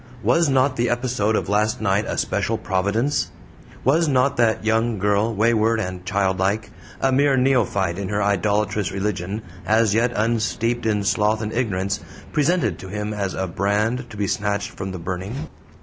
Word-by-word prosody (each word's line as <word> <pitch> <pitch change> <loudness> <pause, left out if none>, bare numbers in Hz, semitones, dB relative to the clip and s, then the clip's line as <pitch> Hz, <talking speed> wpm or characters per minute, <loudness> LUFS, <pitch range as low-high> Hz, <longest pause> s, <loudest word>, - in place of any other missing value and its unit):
Was 140 +9 +3
not 130 0 +2
the 120 +1 +1
episode 120 -3 0
of - - -1
last 105 +1 +1
night 105 0 +1
a - - -3
special 105 +3 0
providence? 105 +9 0 0.5
Was 160 +6 +3
not 140 0 +2
that 110 -2 +2
young 115 +1 +1
girl, 105 +3 +1
wayward 115 +1 +2
and 90 -3 -4
childlike, 100 +1 0 0.3
a 135 - +2
mere 140 +1 +3
neophyte 110 -9 +1
in 100 - -3
her 105 0 0
idolatrous 100 -1 +1
religion, 100 +1 -3 0.2
as 110 -1 +3
yet 115 +2 +2
unsteeped 115 +1 0
in 105 -2 +1
sloth 105 +2 +1
and 110 - -4
ignorance, 100 -5 -1 0.3
presented 170 +4 +1
to 95 - -8
him 105 +2 -4
as 100 -2 -3
a 95 - -1
brand 105 +7 -1
to 105 - -10
be 100 - 0
snatched 100 +1 -1
from 95 -1 -6
the 95 - -5
burning? 95 - -5
105 Hz, 165 wpm, -22 LUFS, 100-120 Hz, 0.5 s, Was